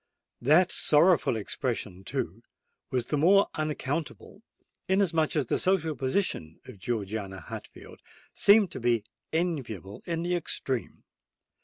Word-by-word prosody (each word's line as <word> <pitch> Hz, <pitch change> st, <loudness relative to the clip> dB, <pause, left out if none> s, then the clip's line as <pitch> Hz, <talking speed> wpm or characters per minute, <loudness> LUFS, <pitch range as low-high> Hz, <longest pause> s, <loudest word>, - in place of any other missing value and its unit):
That 155 Hz, +8 st, +4 dB
sorrowful 155 Hz, -4 st, +4 dB
expression, 105 Hz, -3 st, -3 dB
too, 115 Hz, -, -4 dB, 0.5 s
was 125 Hz, -2 st, -1 dB
the 150 Hz, -, -1 dB
more 195 Hz, +6 st, +5 dB
unaccountable, 155 Hz, -1 st, -4 dB, 0.5 s
inasmuch 170 Hz, -6 st, +2 dB
as 150 Hz, -4 st, +1 dB
the -, -, 0 dB
social 165 Hz, -5 st, +1 dB
position 130 Hz, -, -1 dB
of 100 Hz, -, -12 dB
Georgiana 100 Hz, -2 st, -3 dB
Hatfield 80 Hz, -, -10 dB, 0.3 s
seemed 200 Hz, -2 st, +5 dB
to -, -, -6 dB
be 120 Hz, -3 st, +1 dB, 0.3 s
enviable 125 Hz, -, -3 dB
in 165 Hz, -1 st, -2 dB
the 175 Hz, +1 st, -1 dB
extreme. 135 Hz, -7 st, -3 dB
145 Hz, 120 wpm, -28 LUFS, 115-170 Hz, 0.5 s, more